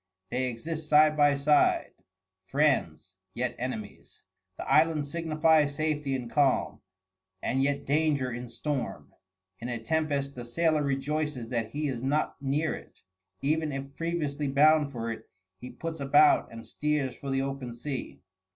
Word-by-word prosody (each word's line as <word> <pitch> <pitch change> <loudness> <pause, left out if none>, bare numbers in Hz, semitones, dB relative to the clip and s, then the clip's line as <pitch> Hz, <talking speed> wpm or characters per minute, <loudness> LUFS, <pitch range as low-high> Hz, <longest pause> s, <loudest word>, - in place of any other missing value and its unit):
They 130 +1 0
exist 155 +6 -5
side 155 0 +6
by 145 -1 +4
side, 145 +1 +3 0.5
friends 130 - 0 0.2
yet 125 0 -2
enemies. 120 -4 -6 0.3
The - - -6
island 155 -1 +3
signifies 155 -1 +2
safety 150 -3 -1
in 125 -2 -4
calm, 140 +1 +1 0.6
and 130 +2 0
yet 140 +1 0
danger 145 -3 +1
in 120 +1 -6
storm; 130 +3 -4 0.5
in 120 - -5
a 120 - -2
tempest 140 +1 -1
the 125 - -7
sailor 155 +5 +1
rejoices 140 -2 -2
that 115 -3 -2
he 150 +5 -2
is 125 -4 -3
not 145 +4 0
near 145 +4 0
it; - - -12 0.4
even 155 +2 +1
if 135 0 -6
previously 150 -4 -2
bound 150 +1 +4
for 115 -3 -4
it, 110 0 -8 0.3
he 125 - -8
puts 165 +2 -6
about 145 +2 +4
and 115 0 -9
steers 150 -3 -1
for 140 - -7
the 135 0 +1
open 135 -2 -4
sea. 125 -4 -6
140 Hz, 150 wpm, -28 LUFS, 130-155 Hz, 0.6 s, side